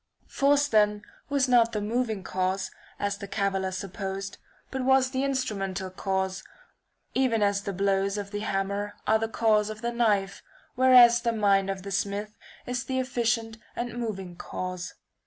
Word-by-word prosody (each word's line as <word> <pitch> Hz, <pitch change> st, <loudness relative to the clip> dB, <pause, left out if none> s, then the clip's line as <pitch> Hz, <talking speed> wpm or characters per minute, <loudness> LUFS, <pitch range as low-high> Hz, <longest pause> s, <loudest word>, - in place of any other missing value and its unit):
Force 285 Hz, +1 st, +2 dB
then 210 Hz, -3 st, +3 dB
n^^oj -, -, -30 dB, 0.3 s
was 280 Hz, -2 st, +2 dB
not 235 Hz, -2 st, +4 dB
the 210 Hz, -, 0 dB
moving 220 Hz, -1 st, -1 dB
cause, 190 Hz, +1 st, -1 dB, 0.3 s
as 200 Hz, -1 st, -2 dB
the 200 Hz, -, -6 dB
caviller 195 Hz, -2 st, -1 dB
supposed, 195 Hz, +1 st, -5 dB, 0.3 s
but 265 Hz, -1 st, -2 dB
was 265 Hz, 0 st, +4 dB
the 265 Hz, 0 st, -1 dB
instrumental 195 Hz, -9 st, -2 dB
cause, 190 Hz, 0 st, -2 dB, 0.7 s
even 245 Hz, -5 st, +2 dB
as 200 Hz, -1 st, +2 dB
the 200 Hz, -, -4 dB
blows 195 Hz, +1 st, +1 dB
of 200 Hz, -1 st, -5 dB
the 205 Hz, -, -3 dB
hammer 200 Hz, 0 st, -2 dB
are 220 Hz, 0 st, +3 dB
the 225 Hz, -, -1 dB
cause 215 Hz, -2 st, +2 dB
of 215 Hz, +1 st, -8 dB
the 235 Hz, -, 0 dB
knife, 205 Hz, -5 st, +1 dB, 0.3 s
whereas 245 Hz, -2 st, +7 dB
the 235 Hz, -, +1 dB
mind 200 Hz, -3 st, +2 dB
of 190 Hz, -1 st, -4 dB
the 200 Hz, -, -6 dB
smith 205 Hz, +2 st, -2 dB, 0.3 s
is 250 Hz, -1 st, -3 dB
the 260 Hz, -, -2 dB
efficient 235 Hz, -3 st, -1 dB, 0.2 s
and 240 Hz, -1 st, -4 dB
moving 195 Hz, -7 st, -4 dB
cause. 185 Hz, 0 st, -5 dB
210 Hz, 165 wpm, -27 LUFS, 195-240 Hz, 0.7 s, whereas